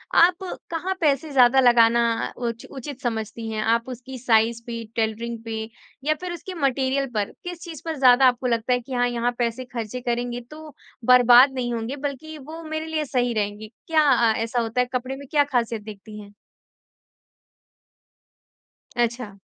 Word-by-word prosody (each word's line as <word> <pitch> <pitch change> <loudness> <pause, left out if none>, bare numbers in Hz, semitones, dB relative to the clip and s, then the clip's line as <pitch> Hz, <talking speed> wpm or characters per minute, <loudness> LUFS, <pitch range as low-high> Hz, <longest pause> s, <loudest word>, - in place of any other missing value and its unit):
आप 360 +2 +5 0.3
कहाँ 355 +3 -2
पैसे 290 0 +1
ज़्यादा 260 0 +5
लगाना 235 -1 +5 0.3
उच 235 -1 -4
उचित 275 +1 -8
समझती 225 -1 -3
हैं? 215 -1 -2
आप 230 +3 +1
उसकी 255 +1 -8
साइज 230 -1 +2
पे, 230 -1 -5
टेलरिंग 230 +1 -2
पे 225 -1 -4 0.4
या 310 - +2
फिर 365 -1 -4
उसके 365 +2 -7
मटेरियल 270 0 +1
पर, 205 -1 -1
किस 355 -1 -6
चीज़ 330 -4 -8
पर 325 -1 -2
ज़्यादा 260 0 +6
आपको 250 0 +1
लगता 235 +1 +1
है 245 - +2
कि 255 +2 -9
हाँ 245 0 +2
यहाँ 240 0 0
पैसे 240 +2 -1
खर्चे 245 0 -5
करेंगे 240 0 -2
तो 310 -1 -11 0.3
बर्बाद 250 +2 +7
नहीं 245 -2 -2
होंगे 230 +4 -3
बल्कि 310 +3 -8
वो 315 +4 -9
मेरे 315 0 -4
लिए 315 -1 -2
सही 245 -2 0
रहेंगे, 210 0 -3 0.2
क्या 320 -1 +4
अ, 235 -3 +4
ऐसा 230 +2 -1
होता 230 +2 0
है 250 - 0
कपड़े 255 +2 -2
में 280 0 -11
क्या 295 -2 +4
ख़ासियत 235 -5 -1
देखती 210 0 -10
हैं? 205 0 -14 2.6
अच्छा। 235 -4 -2
245 Hz, 170 wpm, -23 LUFS, 230-275 Hz, 2.6 s, बर्बाद